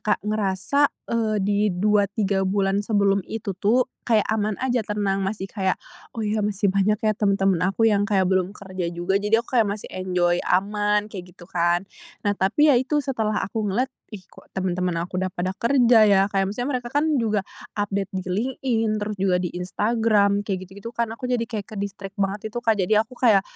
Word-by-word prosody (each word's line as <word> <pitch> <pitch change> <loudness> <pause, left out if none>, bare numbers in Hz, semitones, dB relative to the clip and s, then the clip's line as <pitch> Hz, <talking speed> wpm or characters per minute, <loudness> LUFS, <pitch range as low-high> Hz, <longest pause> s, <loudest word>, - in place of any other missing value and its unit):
Kak, 215 - 0
ngerasa, 215 +7 +1 0.2
eee, 220 -2 +1
di 205 0 +1
2,3 200 +1 +1
bulan 195 0 +1
sebelum 200 -2 +2
itu 215 -3 -4
tuh 215 +7 +2 0.2
kayak 220 -3 +4
aman 215 -1 0
aja, 250 -2 +1
tenang, 205 -2 0
masih 195 0 -3
kayak, 190 -3 0 0.4
"Oh, 225 - -2
ya, 210 +1 0
masih 205 -1 0
banyak, 200 +2 +2
ya, 215 - +3
teman-teman 195 -3 +1
aku 210 +4 +1
yang 205 -1 +2
kayak 195 -3 +3
belum 185 +1 +1
kerja 185 -3 -5
juga," 175 +3 0
jadi 220 +3 +2
aku 250 - -1
kayak 220 - +3
masih 215 - -10
enjoy, 180 -2 0
aman, 210 +2 +1
kayak 180 -4 -9
gitu - - -17
kan. 175 +1 +2 0.4
Nah, 205 - +1
tapi 295 +11 +4
yaitu 275 +3 +2
setelah 225 -6 -1
aku 215 +1 -2
ngeliat, 245 +7 0 0.2
"Ih, 195 - -8
kok - - -17
teman-teman 180 -1 -1
aku 180 +1 -4
udah 190 - 0
pada 180 +1 -1
kerja, 235 -3 +5
ya." 195 -1 +5
Kayak 195 -1 +1
maksudnya 245 +5 -2
mereka 245 -1 -8
kan 295 -1 +2
juga 215 -4 0 0.3
update 200 -1 -2
di 190 - -2
LinkedIn, 230 +1 -1
terus 210 0 -3
juga 185 -1 +2
di 175 - -2
Instagram, 205 +1 +1
kayak 195 -3 -1
gitu - - -13
gitu 230 +3 -7
kan, 235 -1 -1
aku 230 +3 -5
jadi 245 -2 0
kayak 220 -4 -5
ke-distract 200 -1 -6
banget 200 +1 -2
itu, - - -1
Kak, 225 -3 +2
jadi 210 +3 +3
aku 240 +3 -16
kayak 215 -6 +5
205 Hz, 195 wpm, -23 LUFS, 195-225 Hz, 0.4 s, kerja